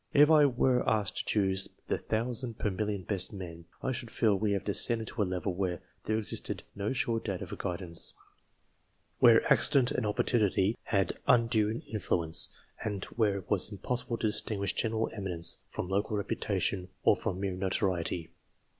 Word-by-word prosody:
If 150 +2 +7
I 150 -2 +6
were 125 -1 +2
asked 105 -2 0
to - - -2
choose 95 -2 +1 0.2
the - - -1
thousand 115 +1 -2
per 105 - -1
million 100 0 -3
best 95 0 -2
men, 85 -4 -8 0.2
I 130 - 0
should 120 -2 -5
feel 110 -2 +2
we 105 +1 0
had 100 - -2
descended 110 +2 0
to 115 - -4
a - - +3
level 90 +1 -2
where 90 -1 -2 0.3
there 110 - 0
existed 110 - -3
no 100 +1 -3
sure 120 -3 0
data 95 -5 -4
for - - -7
guidance, 85 -1 -5 1.0
where - - +6
accident 130 -3 +6
and 110 - -1
opportunity 105 -1 +1
had 100 -3 0
undue 115 -2 +2
influence, 85 -6 +4 0.3
and 105 -3 -3
where 105 -4 +1
it 95 - -9
was 105 +1 +2
impossible 115 +4 -3
to 115 - -3
distinguish 105 -2 0
general 110 -1 -1
eminence 85 -5 +1
from - - -5
local 100 +3 -1
reputation, 95 -2 -2 0.2
or - - +5
from 90 - -4
mere 95 -1 -2
notoriety. 90 -3 -2
105 Hz, 165 wpm, -30 LUFS, 95-115 Hz, 1.0 s, If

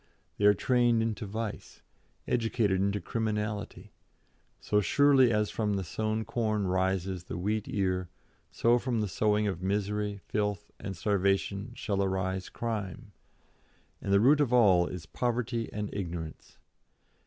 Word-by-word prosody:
They 100 - +2
are 105 0 +7
trained 120 +2 +2
into 110 -1 -3
vice, 110 +1 -6 0.4
educated 115 -5 +1
into 100 +1 +1
criminality; 105 -2 -3 0.7
so 105 0 +1
surely 135 +2 +5
as 105 -1 +1
from 105 -2 0
the 95 - -1
sown 110 +5 -2
corn 110 -2 0
rises 95 -1 -1
the - - -5
wheat 105 +4 -1
ear, 90 -3 -1 0.4
so 120 +1 +3
from 120 -3 -1
the 105 - 0
sowing 105 +2 +1
of 95 -4 -2
misery, 105 +1 -1
filth, 105 -1 -2
and 95 -3 -6
starvation 100 +3 0
shall 100 -5 -1
arise 95 -1 -1
crime. 105 -7 -4 0.9
And 100 - -3
the 100 - +6
root 140 +7 +5
of 135 -4 +1
all 95 -8 +5
is 90 -3 -7
poverty 120 +4 -2
and 105 0 -3
ignorance. 85 -5 -6
105 Hz, 140 wpm, -29 LUFS, 95-115 Hz, 0.9 s, are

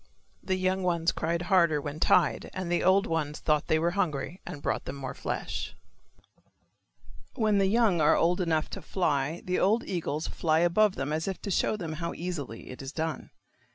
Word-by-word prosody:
The 190 - -1
young 185 +1 0
ones 170 -2 +1
cried 170 +2 -2
harder 170 -5 +3
when 145 +1 -6
tied 165 -2 +3
and 185 -2 -3
the 175 - +1
old 190 +2 +4
ones 155 -2 -2
thought 150 -2 +1
they 160 - +3
were 170 +2 +1
hungry 175 -2 -2
and 145 - -6
brought - - -2
them 135 - -5
more 135 -1 -5
flesh. - - -4 1.6
When 215 -4 +2
the 195 - +3
young 210 -5 +3
are 150 - +5
old 175 +3 +2
enough 160 -3 +1
to - - -6
fly 155 -3 -1
the 180 0 0
old 220 +5 +3
eagles 160 -4 -3
fly 160 -1 +1
above 190 +4 +3
them 140 +3 -2
as 160 +3 -2
if 190 - -3
to 200 - -3
show 210 - +1
them 165 -5 -4
how 170 0 -3
easily 155 -12 -5
it 125 - -9
is 135 0 -6
done. 160 0 -3
170 Hz, 190 wpm, -28 LUFS, 155-185 Hz, 1.6 s, are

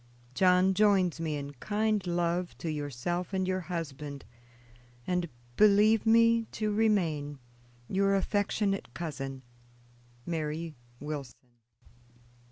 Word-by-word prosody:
John 185 +4 +4
joins 190 -5 +3
me 160 -2 -2
in 140 0 -5
kind 210 - -1
love 175 0 -1
to 165 - -3
yourself 150 +6 -3
and 190 -1 0
your 185 0 0
husband, 150 -5 -6 0.8
and 180 -2 -1 0.3
believe 215 +1 +5
me 230 0 +5
to 215 -1 -1
remain, 170 -10 +1 0.5
"Your 195 +1 +2
Affectionate 200 - 0
Cousin, 135 -5 -5 0.8
"MARY 160 0 -3 0.3
WILSON." 145 -3 -5
180 Hz, 100 wpm, -30 LUFS, 150-205 Hz, 0.8 s, believe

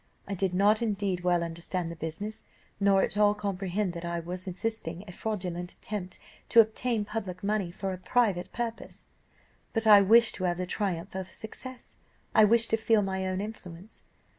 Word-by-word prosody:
I 200 - -3
did 190 -1 -1
not 205 +4 +4
indeed 200 -5 -1
well 175 -1 +2
understand 170 +1 -3
the - - -7
business, 165 +7 -5 0.4
nor 200 -1 +4
at - - -2
all 210 0 +4
comprehend 195 -1 -2
that 170 0 -6
I 170 0 -2
was 180 +3 -6
assisting 185 -2 -4
a - - -7
fraudulent 180 -3 -4
attempt 185 -4 -6 0.3
to 235 - +6
obtain 220 0 +3
public 200 -4 -5
money 200 -3 0
for 190 +2 -4
a 185 - -7
private 185 -2 +1
purpose, 230 -1 -5 0.7
but 225 -1 0
I 210 -2 +9
wished 225 +4 +6
to 185 - -2
have 175 -1 0
the 185 - -2
triumph 190 -1 -2
of 190 -1 -5
success, 250 +5 -10 0.4
I 215 - +7
wished 230 +2 +4
to 225 - +4
feel 220 -1 +3
my 190 -1 -2
own 185 +1 -1
influence. 200 -2 -9
195 Hz, 180 wpm, -29 LUFS, 180-215 Hz, 0.7 s, I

